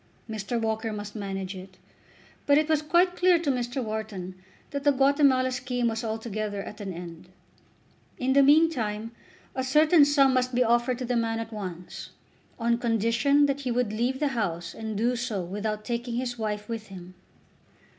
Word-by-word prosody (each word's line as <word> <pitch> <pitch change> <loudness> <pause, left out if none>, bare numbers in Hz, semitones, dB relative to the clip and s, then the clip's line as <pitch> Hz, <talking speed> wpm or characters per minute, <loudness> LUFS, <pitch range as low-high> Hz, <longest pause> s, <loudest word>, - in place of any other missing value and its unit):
Mr. 220 +1 -3
Walker 220 0 -1
must 205 0 -6
manage 195 -2 -4
it, 185 0 -11 0.7
but 285 0 +6
it 305 0 +2
was 315 -2 +2
quite 350 +4 +3
clear 360 -1 +4
to 325 -4 0
Mr. 250 +1 -2
Wharton 215 -4 -5 0.4
that 280 -1 -3
the 290 - +5
Guatemala 270 -1 +3
scheme 250 -1 -1
was 225 +1 -3
altogether 215 -2 -3
at 210 - -9
an 195 -2 -4
end. 170 0 -9 0.9
In 260 +1 +1
the 280 - +6
meantime 255 -8 +3 0.4
a 260 - -2
certain 305 +4 +5
sum 280 -2 +4
must 255 -1 0
be 250 - +4
offered 240 +1 +2
to 255 - -4
the 245 0 -1
man 225 -1 0
at 225 0 -6
once, 180 -4 -7 0.5
on 235 0 +1
condition 235 +5 +2
that 280 -1 0
he 260 - -3
would 240 -3 0
leave 245 +4 -1
the 295 - +1
house 175 -9 -3
and 220 -2 -5
do 240 +3 +1
so 230 -6 -2
without 210 +4 -4
taking 235 +1 -3
his 245 0 -2
wife 210 -2 -3
with 225 -2 -5
him. 185 -2 -11
235 Hz, 175 wpm, -27 LUFS, 210-265 Hz, 0.9 s, but